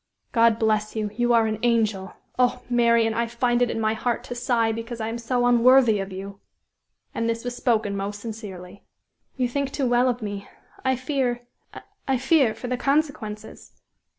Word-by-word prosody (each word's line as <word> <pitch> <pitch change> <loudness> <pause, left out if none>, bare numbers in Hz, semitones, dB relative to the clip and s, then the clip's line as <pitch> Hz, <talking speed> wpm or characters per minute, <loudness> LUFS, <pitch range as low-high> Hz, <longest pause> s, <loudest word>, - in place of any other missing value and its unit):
"God 230 -2 +4
bless 215 -1 0
you; 215 -2 -2
you 240 +1 +1
are 230 -1 +4
an 215 -1 -2
angel! 215 -5 0 0.2
Oh! 250 -1 +2
Marian! 235 -2 +3
I 235 +1 0
find 240 +1 0
it 245 - +3
in 225 - -2
my 220 0 +1
heart 235 +2 -2
to 250 - -6
sigh 240 -2 +1
because 230 +1 -6
I 220 0 -2
am 230 +1 -4
so 245 +1 0
unworthy 245 -2 +5
of 195 0 -5
you!" 195 +1 -8 0.7
And 230 0 -1
this 230 0 -2
was 245 0 -3
spoken 220 -5 0
most 200 +1 -4
sincerely. 200 -4 -9 0.5
"You 255 -1 +1
think 280 +2 -2
too 275 - -1
well 245 +1 +3
of 245 -2 -3
me. 205 -1 -5 0.4
I 260 0 +2
fear 255 -2 -2 0.6
I 265 -1 +2
fear 265 -3 +3
for 225 +3 -7
the 250 0 -1
consequences." 255 -7 -2
235 Hz, 180 wpm, -24 LUFS, 215-245 Hz, 0.7 s, unworthy